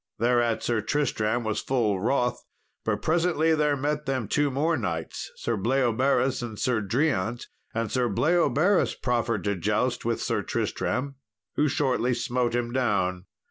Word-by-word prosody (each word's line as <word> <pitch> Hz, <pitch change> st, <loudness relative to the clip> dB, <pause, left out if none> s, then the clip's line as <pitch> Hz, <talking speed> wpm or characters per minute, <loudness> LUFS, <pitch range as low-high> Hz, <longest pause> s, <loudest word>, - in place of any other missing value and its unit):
Thereat 120 Hz, 0 st, +2 dB
Sir 115 Hz, -2 st, 0 dB
Tristram 120 Hz, -5 st, 0 dB
was 110 Hz, -1 st, -1 dB
full 110 Hz, -7 st, 0 dB
wroth, 125 Hz, +3 st, 0 dB, 0.4 s
but -, -, -1 dB
presently 165 Hz, -1 st, +2 dB
there 150 Hz, -2 st, +2 dB
met 150 Hz, +1 st, -2 dB
them 130 Hz, -5 st, -1 dB
two 145 Hz, +6 st, +1 dB
more 150 Hz, +5 st, +1 dB
knights, 80 Hz, -, -4 dB
Sir 115 Hz, -, -2 dB
Bleoberis 130 Hz, +3 st, +1 dB
and 115 Hz, -3 st, -6 dB
Sir 120 Hz, -1 st, +1 dB
Driant; 120 Hz, 0 st, 0 dB, 0.3 s
and 115 Hz, -1 st, -1 dB
Sir 125 Hz, -2 st, +1 dB
Bleoberis 175 Hz, -, +2 dB
proffered 120 Hz, -2 st, -1 dB
to 100 Hz, -1 st, 0 dB
joust 105 Hz, +7 st, 0 dB
with 115 Hz, 0 st, -1 dB
Sir -, -, -1 dB
Tristram, 140 Hz, +1 st, -2 dB, 0.4 s
who 150 Hz, -, +3 dB
shortly 125 Hz, -3 st, +1 dB
smote 120 Hz, 0 st, -1 dB
him 120 Hz, -1 st, -1 dB
down. 95 Hz, -7 st, 0 dB
125 Hz, 145 wpm, -26 LUFS, 110-140 Hz, 0.4 s, who